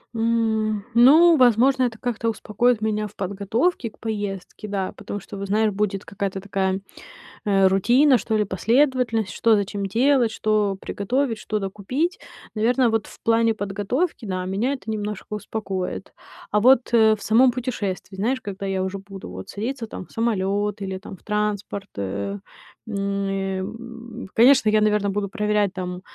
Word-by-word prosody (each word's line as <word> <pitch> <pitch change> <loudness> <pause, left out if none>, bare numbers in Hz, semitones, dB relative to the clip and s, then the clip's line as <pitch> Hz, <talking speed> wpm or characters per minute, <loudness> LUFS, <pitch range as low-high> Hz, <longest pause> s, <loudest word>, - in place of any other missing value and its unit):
М, 220 -2 0
ну, 310 +8 +7
возможно, 255 +2 +4
это 235 -3 -2
как-то 230 -2 -1
успокоит 225 +2 +1
меня 215 -1 -1
в 210 - -17
подготовке 205 - -1
к - - -26
поездке, 205 -2 -5
да. 195 -2 -3
Потому 205 - -6
что, 200 - -10
вот 200 0 -5
знаешь, 215 +2 +2
будет 200 -1 -2
какая-то 200 -1 -3
такая, 190 -1 -1 0.7
э, 195 -2 +4
рутина, 245 +8 +4
что 220 -2 -1
ли, 210 - +1
последовательность: 230 +1 +1
что 225 -1 +3
за 205 - +1
чем 200 0 -4
делать, 245 +2 +3
что 210 -3 0
приготовить, 235 +3 -1
что 215 0 -2
докупить. 210 - -2 0.4
Наверно, 240 +3 +3
вот 225 -1 0
в - - -15
плане 230 0 +3
подготовки, 215 - -2
да, 185 -2 -3
меня 205 +9 0
это 255 -5 -8
немножко 210 -2 -4
успокоит. 200 -3 -4 0.4
А 210 - +3
вот, 255 0 +4
э, 220 -1 +6
в 210 - -15
самом 245 +4 +5
путешествии, 220 -7 -4
знаешь, 255 +6 0
когда 200 -1 -6
я 190 -1 -1
уже 190 +1 -3
буду, 195 -1 -10
вот, 95 - -9
садиться, 230 +2 -4
там, 185 - -8
в - - -23
самолёт 205 -2 -1
или, 190 -1 -3
там, 190 -2 -10
в - - -28
транспорт, 210 -1 -2
э, 100 +1 -3 0.5
м, 215 - -5
э, 195 -1 -2
м, 235 +2 -8
конечно, 235 -1 +6
я, 215 0 +4
наверно, 210 -1 +2
буду 200 0 -1
проверять, 210 -2 0
там, 180 -1 -5
210 Hz, 165 wpm, -23 LUFS, 195-230 Hz, 0.7 s, ну